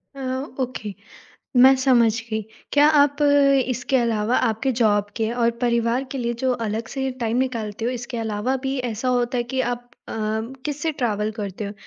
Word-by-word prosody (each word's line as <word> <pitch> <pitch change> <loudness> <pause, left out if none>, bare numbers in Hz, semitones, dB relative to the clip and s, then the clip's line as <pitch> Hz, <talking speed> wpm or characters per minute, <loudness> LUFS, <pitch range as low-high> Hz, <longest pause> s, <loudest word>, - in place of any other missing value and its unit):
अ, 275 - -8 0.4
okay. 230 -5 -3 0.6
मैं 260 +2 +8
समझ 240 -4 +5 0.2
गयी। 220 0 -1 0.3
क्या 290 0 +6 0.2
आप 285 +1 0 0.5
इसके 255 +2 0
अलावा 230 -1 +1
आपके 225 +5 0
जॉब 205 -2 +3
के 220 -1 0
और 235 -1 +2
परिवार 235 +2 +1
के 270 - -4
लिए 235 -1 -1
जो 260 -1 +2
अलग 220 +2 -3
से 265 -1 -1
टाइम 230 0 0
निकालते 230 -4 -2
हो 245 - +1
इसके 240 -1 -5
अलावा 220 +4 -1
भी 270 +1 -1 0.2
ऐसा 230 +4 -3
होता 245 0 +1
है 240 - 0
कि 260 - +1
आप 245 -1 -2 0.2
अ, - - -5 0.5
किससे 295 +2 -2
ट्रैवल 215 -6 -1
करते 205 -1 -5
हो? 200 - -5
240 Hz, 175 wpm, -23 LUFS, 220-260 Hz, 0.6 s, मैं